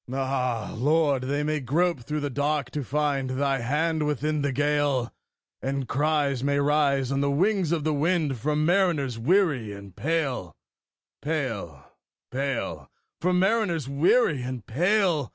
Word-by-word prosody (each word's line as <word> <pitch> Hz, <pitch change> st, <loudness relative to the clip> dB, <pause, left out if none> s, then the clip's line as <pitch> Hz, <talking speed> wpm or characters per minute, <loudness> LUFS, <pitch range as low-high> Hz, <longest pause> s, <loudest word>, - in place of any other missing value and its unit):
Ah, 130 Hz, -3 st, -1 dB
Lord! 145 Hz, +1 st, +2 dB
they 145 Hz, +2 st, -1 dB
may 155 Hz, 0 st, 0 dB
grope 160 Hz, +5 st, +1 dB
through 150 Hz, +5 st, -4 dB
the 145 Hz, -1 st, -2 dB
dark 145 Hz, -1 st, -1 dB
to 145 Hz, 0 st, -3 dB
find 140 Hz, 0 st, -1 dB
Thy 135 Hz, +1 st, 0 dB
hand 150 Hz, +5 st, 0 dB
within 150 Hz, +1 st, -1 dB
the 140 Hz, -1 st, 0 dB
gale; 145 Hz, -2 st, 0 dB, 0.5 s
And 135 Hz, -1 st, -2 dB
cries 145 Hz, -2 st, 0 dB
may 140 Hz, 0 st, +1 dB
rise 140 Hz, -2 st, +2 dB
on 135 Hz, 0 st, 0 dB
the 140 Hz, -, +1 dB
wings 185 Hz, +3 st, +1 dB
of 165 Hz, -3 st, 0 dB
the 155 Hz, 0 st, +1 dB
wind 150 Hz, -3 st, 0 dB
From 150 Hz, +5 st, 0 dB
mariners 165 Hz, -, +1 dB
weary 140 Hz, -, +2 dB
and 100 Hz, -2 st, -11 dB
pale, 135 Hz, -, -2 dB, 0.7 s
pale, 115 Hz, -, -3 dB, 0.5 s
pale 135 Hz, -1 st, -3 dB, 0.3 s
From 180 Hz, +1 st, +1 dB
mariners 190 Hz, -, +1 dB
weary 150 Hz, -, +3 dB
and 125 Hz, -3 st, -5 dB
pale! 175 Hz, -, +1 dB
145 Hz, 145 wpm, -26 LUFS, 130-155 Hz, 0.7 s, weary